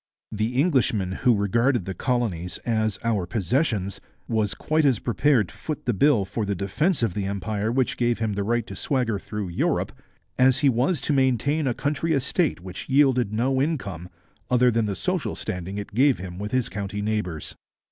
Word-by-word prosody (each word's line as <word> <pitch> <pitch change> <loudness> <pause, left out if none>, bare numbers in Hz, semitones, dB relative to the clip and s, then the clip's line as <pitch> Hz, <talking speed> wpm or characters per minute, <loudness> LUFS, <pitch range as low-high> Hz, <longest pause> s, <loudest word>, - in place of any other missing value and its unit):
The 110 +3 -2
Englishman 125 - +2
who 120 +5 +2
regarded 115 +2 +1
the 95 - -3
colonies 95 -6 -1
as 110 -3 0
'our 105 -6 0
possessions' 105 - -1 0.3
was 110 -3 0
quite 155 0 +1
as 135 -5 +4
prepared 120 - +2
to - - -15
foot 155 -2 -5
the 120 - +1
bill 110 -1 +3
for 100 +3 -3
the 100 -1 -1
defence 120 - 0
of 110 -6 +1
the 100 -2 -2
Empire 100 +2 -2
which 130 0 0
gave 120 -1 +1
him 110 -2 -1
the 100 - -2
right 120 +2 0
to - - -8
swagger 125 -7 0
through 105 -1 -5
Europe, 85 - 0 0.5
as 130 +1 +4
he - - +7
was 130 +6 +1
to 150 - 0
maintain 135 +3 +2
a 120 - 0
country 150 +3 -1
estate 140 - 0
which 95 +5 -8
yielded 130 -5 +3
no 130 +5 +1
income 100 - -3 0.4
other 125 0 +4
than 115 -1 +1
the 100 - -2
social - - -2
standing 90 +2 -5
it 105 - -6
gave 135 +4 +4
him 90 -1 -7
with 105 +1 -4
his 130 -2 +1
county 100 0 -4
neighbours. 105 -8 -2
115 Hz, 190 wpm, -25 LUFS, 100-130 Hz, 0.5 s, he